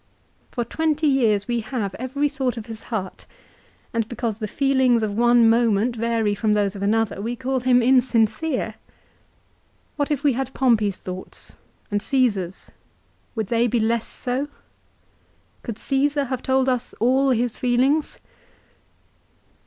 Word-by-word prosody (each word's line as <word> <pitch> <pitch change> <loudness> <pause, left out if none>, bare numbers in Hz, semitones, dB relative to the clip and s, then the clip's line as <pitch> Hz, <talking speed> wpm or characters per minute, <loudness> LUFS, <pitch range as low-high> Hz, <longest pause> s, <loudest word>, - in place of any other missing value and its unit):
For 240 - -3
twenty 310 +4 0
years 230 -8 +2
we 240 -1 0
have 220 -4 -3
every 275 +4 -1
thought 265 -4 -2
of 220 - -6
his 225 -2 -9
heart, 200 -6 -5 0.7
and 230 -2 0
because 230 -3 -3
the 215 - -3
feelings 260 -2 +2
of 205 -2 -2
one 240 0 +5
moment 230 0 +2
vary 230 -2 0
from 210 +1 +1
those 205 -1 +1
of 195 - -7
another, 215 0 0
we 235 +3 -3
call 260 +1 -1
him 250 -1 +3
insincere. 250 +3 +2 1.2
What 285 -1 0
if 290 -1 -1
we 285 -3 +4
had 265 +1 -4
Pompey's 220 -7 +2
thoughts, 185 0 -8 0.4
and 205 0 0
Caesar's, 210 -8 -1 0.6
would 220 -2 -1
they 235 +1 +3
be 240 +1 +1
less 230 +1 0
so? 260 +3 -3 1.1
Could 230 -4 -6
Caesar 280 +3 +1
have 260 -2 -3
told 265 0 +1
us 250 -2 -1
all 260 +4 +3
his 245 -2 0
feelings? 260 +5 +1
240 Hz, 145 wpm, -23 LUFS, 220-265 Hz, 1.2 s, one